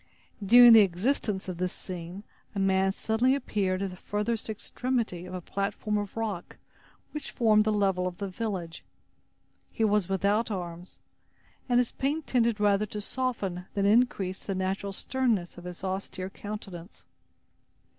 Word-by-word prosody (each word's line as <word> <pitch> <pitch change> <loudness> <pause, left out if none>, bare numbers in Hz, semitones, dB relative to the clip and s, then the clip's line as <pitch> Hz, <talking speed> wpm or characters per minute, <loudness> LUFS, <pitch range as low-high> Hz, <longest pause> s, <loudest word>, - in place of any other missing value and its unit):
During 240 +3 +9
the 225 - +10
existence 200 +1 0
of 180 -2 -5
this 180 0 0
scene, 180 +1 -7 0.3
a - - -1
man 190 0 +3
suddenly 225 +6 +1
appeared 200 -8 -1
at 195 - -3
the - - -9
furthest 210 +4 -2
extremity 220 -4 -2
of 180 - -6
a 180 - -4
platform 200 +3 -2
of 205 +1 -6
rock 210 -6 -4 0.5
which 300 -2 -5
formed 215 -3 +3
the 215 - +2
level 195 -3 +1
of 180 -1 -6
the 200 - -3
village. 185 -5 -4 0.9
He 225 - -1
was 210 -4 +2
without 200 +4 +1
arms, 175 -3 -6 0.7
and 245 - +4
his 245 - +1
paint 290 +3 -2
tended 235 -3 +2
rather 205 0 +3
to 210 - -5
soften 205 -6 -2
than 200 -1 +1
increase 200 -4 +2
the 195 - -3
natural 190 +1 -2
sternness 215 -5 -1
of 175 - -13
his 180 +1 -8
austere 190 0 -4
countenance. 200 -4 -8
200 Hz, 155 wpm, -28 LUFS, 185-225 Hz, 0.9 s, the